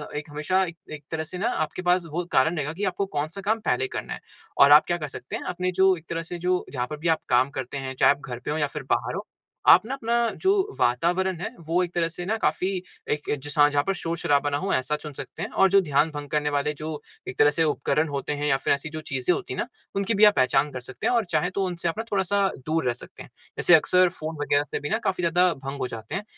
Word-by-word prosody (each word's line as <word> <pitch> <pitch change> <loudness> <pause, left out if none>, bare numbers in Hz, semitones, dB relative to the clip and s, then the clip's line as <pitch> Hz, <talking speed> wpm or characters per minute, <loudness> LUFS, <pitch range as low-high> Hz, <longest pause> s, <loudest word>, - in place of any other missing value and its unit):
एक 150 +1 -5
हमेशा 155 +6 +1
एक 170 -2 -8 0.2
एक 145 -1 -8
तरह 160 0 -2
से 180 +3 -7
न 195 - -4
आपके 155 +4 -1
पास 180 -1 +2
वो 175 +3 -1
कारण 160 +6 +3
रहेगा 150 +1 -2
कि 200 +4 -5
आपको 190 +1 -1
कौन-सा 160 +2 -4
काम 220 +3 0
पहले 130 +1 +1
करना - - -5
है - - -7 0.4
और 140 +1 +8
आप 150 +1 +8
क्या 175 0 0
कर 150 -3 -4
सकते 130 -2 -7
है - - -5
आपने 180 +1 -1
जो 190 -1 +6
एक 160 - -15
तरह 165 +1 -4
जो 180 +1 0
जहाँ 125 -2 -2
पे 150 - -6
भी 165 +3 -3
आप - - -33
काम 125 +3 +4
करते 130 +2 -5
है 130 -1 -4
चाहें 130 - +5
आप 145 - -20
घर 120 - -5
पे - - -1
हो 155 - -1
या 145 -2 +1
फिर 150 0 -7
बाहर - - 0
हो - - -5 0.4
आप 175 - +9
न - - -10
अपना 235 -3 -1 0.3
जो 380 - +4 0.3
वातावरण 175 +9 +1
है - - -2 0.2
वो 175 +2 +2
एक 175 - -5
तरह 170 -1 +1
से 175 +1 -7 0.2
काफ़ी 185 - +1 0.4
एक 145 0 -2
एक 145 - 0
जैसा 145 0 +4
जहाँ 145 0 +1
पे 195 - 0
शोर-शराबा 165 -5 0
ना 145 - 0
हो 195 +5 -2
ऐसा 130 +3 0
चुन 150 -1 -8
सकते - - -7
है। - - -2
और 195 0 +3
ध्यान 150 -1 +2
भंग 145 -1 -7
करने 150 -1 0
वाले 145 +1 0
जो 155 - -4 0.4
एक - - -6
तरह 145 0 +7
से 165 +2 +1
उपकरण 155 +1 +1
होते 140 0 -3
है 150 - 0
या 135 -2 +3
फिर 135 - +1
ऐसी 140 +2 -4
जो 155 0 -6
चीज़ें 135 +3 0
होती - - -4
है - - -5
ना - - -1 0.3
उनकी 200 +3 0
भी 210 +1 +3
आप 210 - +6
पहचान 130 +3 +3
कर 130 - -5
सकते 125 +1 -5
है - - +2
और 230 -3 +2
चाहें 180 - +1
तो 195 +1 -1
उनसे 175 -2 -3
आप 165 - -4
थोड़ा-सा 200 0 +2 0.2
दूर 160 -2 0
रह 120 - +2
सकते 125 - -11
है। - - -15 0.3
जैसे 175 - +4
अक्सर 180 +3 +4
फ़ोन 155 +1 -4
वगैरह 145 0 +2
से - - -1
भी 145 - -5
न 220 - +1
काफ़ी 185 -3 -1
ज़्यादा 175 +2 +3
भंग 135 0 -7
हो 130 - -1
जाते 115 -1 -7
है 195 - -3
155 Hz, 270 wpm, -25 LUFS, 145-180 Hz, 0.4 s, आप